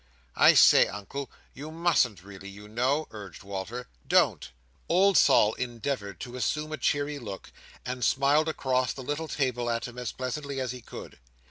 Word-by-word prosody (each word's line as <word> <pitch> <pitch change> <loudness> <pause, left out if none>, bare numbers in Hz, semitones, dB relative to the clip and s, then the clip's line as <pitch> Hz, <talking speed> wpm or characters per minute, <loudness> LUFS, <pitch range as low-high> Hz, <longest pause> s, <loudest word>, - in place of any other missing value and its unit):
"I - - +6
say, - - +7
Uncle! 120 +7 -6 0.2
You 145 +4 -8
musn't 155 - +1
really, 100 0 -11
you 105 +1 -12
know!" 130 +8 0
urged 100 -5 -10
Walter. 100 +5 -6 0.2
"Don't!" 60 - +2 0.4
Old 190 +3 +4
Sol 105 -7 +5
endeavoured 120 -5 -4
to 125 -1 -7
assume 150 +4 -2
a 155 - -3
cheery 145 0 -1
look, 100 -6 -8 0.3
and 125 0 -4
smiled 140 +6 +3
across 130 -5 0
the 130 - -8
little 145 +4 -3
table 125 -5 -1
at 115 0 -1
him 120 0 -9
as 125 -3 -3
pleasantly 135 +2 -4
as 130 -2 -2
he 125 -1 -8
could. - - -11
125 Hz, 165 wpm, -27 LUFS, 110-145 Hz, 0.4 s, say